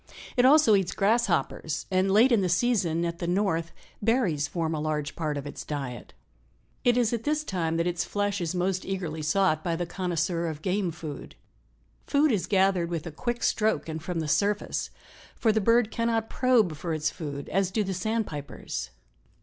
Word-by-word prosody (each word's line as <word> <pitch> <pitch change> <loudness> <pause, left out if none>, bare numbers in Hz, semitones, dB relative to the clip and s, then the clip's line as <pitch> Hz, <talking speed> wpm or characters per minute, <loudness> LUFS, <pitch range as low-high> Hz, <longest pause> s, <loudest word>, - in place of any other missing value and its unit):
It 250 -1 +4
also 285 -4 +6
eats 195 -3 +2
grasshoppers 195 -7 0
and 185 +1 +2
late 220 +7 +5
in 230 -4 +4
the 185 - 0
season, 180 -4 +1
at 170 0 -3
the 170 - -3
North, 175 -3 0 0.3
berries 205 - +1
form 165 -2 -2
a 155 - -2
large 150 -2 -2
part 155 -3 -2
of 140 - -5
its 145 - -7
diet. 135 -6 -6 0.7
It 245 0 +4
is 240 -2 +2
at 230 -1 -2
this 300 +1 0
time 165 - -1
that 170 - +1
its 175 -1 0
flesh 205 -1 -1
is 170 +1 -2
most 185 +1 0
eagerly 175 -5 -4
sought 155 0 +2
by 170 -1 0
the 175 +1 -2
connoisseur 170 -1 -1
of 155 -1 -6
game 190 0 0
food. 155 -3 -8 0.7
Food 290 +1 +3
is 205 -6 0
gathered 190 -3 +2
with 170 -2 -3
a 165 - -5
quick 240 +9 -3
stroke 215 -4 +1
and 160 0 -4
from 165 +1 -3
the 155 - -3
surface, 200 +7 0 0.5
for 225 - +2
the 220 0 +1
bird 230 +1 +3
cannot 230 -1 -1
probe 235 -10 +3
for 160 +2 -3
its 155 0 0
food 145 -4 -6
as 195 0 +1
do 210 +3 0
the 195 -1 -3
sandpipers. 185 - -3
180 Hz, 190 wpm, -27 LUFS, 160-215 Hz, 0.7 s, also